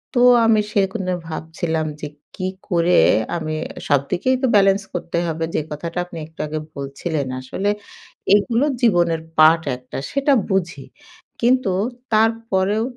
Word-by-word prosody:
তো 245 - +3 0.2
আমি 220 -1 +4
সেরকম 195 0 0
ভেবে 180 - 0 0.2
ভাবছিলাম 160 0 -3
যে 150 - -3 0.3
কী 185 - -3 0.2
করে 175 -1 +3 0.4
আমি 155 -1 -3 0.3
সবদিকেই 150 - +1
তো 265 - +2
ব্যালান্স 195 0 +4
করতে 170 -1 -3
হবে 165 0 -2
যে - - +1
কথাটা 165 +3 -5
আপনি 175 -2 -10
একটু 160 - -27
আগে 155 +1 -3 0.2
বলছিলেন 140 +1 -3
আসলে 190 +10 -2 0.7
এগুলো 230 +6 +2 0.2
জীবনের 175 -7 +3 0.2
পার্ট 160 +1 +6
একটা 125 0 -9
সেটা 275 +1 +2 0.2
বুঝি। 175 -7 -1 0.6
কিন্তু 245 -4 +3 0.4
তারপরেও 220 -2 +1
175 Hz, 135 wpm, -20 LUFS, 160-210 Hz, 0.7 s, পার্ট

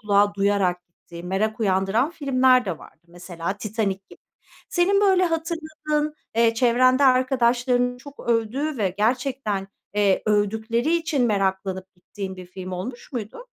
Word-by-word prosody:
kulağa 205 -1 +2
duyarak 200 -2 +1
gittiği, 170 0 -13
merak 210 +5 -1
uyandıran 195 - +1
filmler 260 -5 +3
de 180 -5 -4
vardı. - - -16
Mesela 175 +2 -6
“Titanik” 200 -2 -3
gibi. - - -15 0.5
Senin, 385 +3 +2
böyle, 380 -2 +4
hatırladığın, 315 -2 -2 0.2
eee, 230 -1 +4
çevrende 255 +3 +4
arkadaşlarının 245 -1 +2
çok 285 +2 -12
övdüğü 240 +5 0
ve 190 -3 0
gerçekten, 230 -4 -1 0.3
eee, 205 -2 +2
övdükleri 220 +8 +1
için 310 -6 0
meraklanıp 190 -2 -1
gittiğin 190 +1 -8
bir 185 - -10
film 185 +1 -8
olmuş 240 +10 -7
muydu? 240 - -6
225 Hz, 130 wpm, -23 LUFS, 195-265 Hz, 0.5 s, böyle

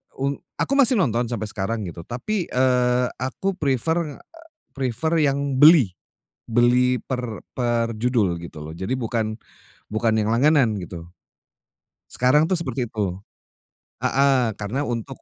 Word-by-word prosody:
un 140 +1 -2 0.2
aku - - -1
masih 255 -2 +6
nonton 120 - +1
sampai 110 -3 -3
sekarang, 110 +2 -3
gitu. 85 -2 -8
Tapi, 175 - -3
eee, 125 -1 +2
aku 130 +10 -2
prefer 150 +3 0 0.6
prefer 135 +5 -1
yang 140 -2 0
beli. 150 - +7 0.6
Beli 125 +2 +3
per 125 -4 -5
perjudul, 115 -5 0
gitu 80 -3 -9
loh. 80 - -7
Jadi 95 +10 -3
bukan 110 -3 -2 0.5
bukan 110 +1 0
yang 110 -1 +1
langganan, 125 -1 +3
gitu. 85 -3 -8 1.0
Sekarang 150 +6 +3
tuh 185 - +2
seperti 130 -7 -2
itu. 100 -4 -3 0.8
Heeh, 135 -3 +3
karena 105 +7 -3
untuk 125 0 -4
125 Hz, 125 wpm, -23 LUFS, 110-140 Hz, 1.0 s, beli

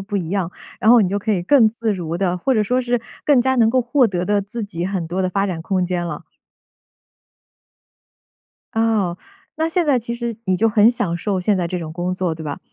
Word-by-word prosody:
不 200 +1 -4
一 170 -3 -3
样， 190 -4 -1 0.3
然 220 - +4
后 240 -3 +7
你 185 - +1
就 200 +2 -1
可 215 +2 -3
以 185 -4 +1
更 230 +2 +5
自 225 -1 -2
如 170 -3 -4
地， 180 -1 0
或 260 +8 +1
者 215 - +3
说 250 +4 +1
是 245 -1 0 0.3
更 275 -5 +5
加 260 0 +1
能 225 -2 +4
够 255 +1 +2
获 245 +1 +3
得 180 -3 -2
的 205 +1 +1
自 215 +3 -5
己 175 -3 -4
很 190 -4 -3
多 180 +3 -3
的 185 - +1
发 195 +2 0
展 175 -4 -4
空 185 +1 0
间 175 -1 -2
了。 - - -6 2.5
哦， 220 -6 +1 0.4
那 320 +1 0
现 340 -1 0
在 270 -4 +3
其 235 +1 -5
实 235 -2 -4
你 185 -1 +2
就 225 +4 +3
很 215 +1 +5
享 180 -8 -2
受 190 +1 -2
现 200 +2 +1
在 175 -2 -1
这 180 - -3
种 160 -2 -6
工 180 +2 -2
作， 180 -3 -1
对 160 - -9
吧？ 145 - -4
200 Hz, 250 characters per minute, -20 LUFS, 180-235 Hz, 2.5 s, 后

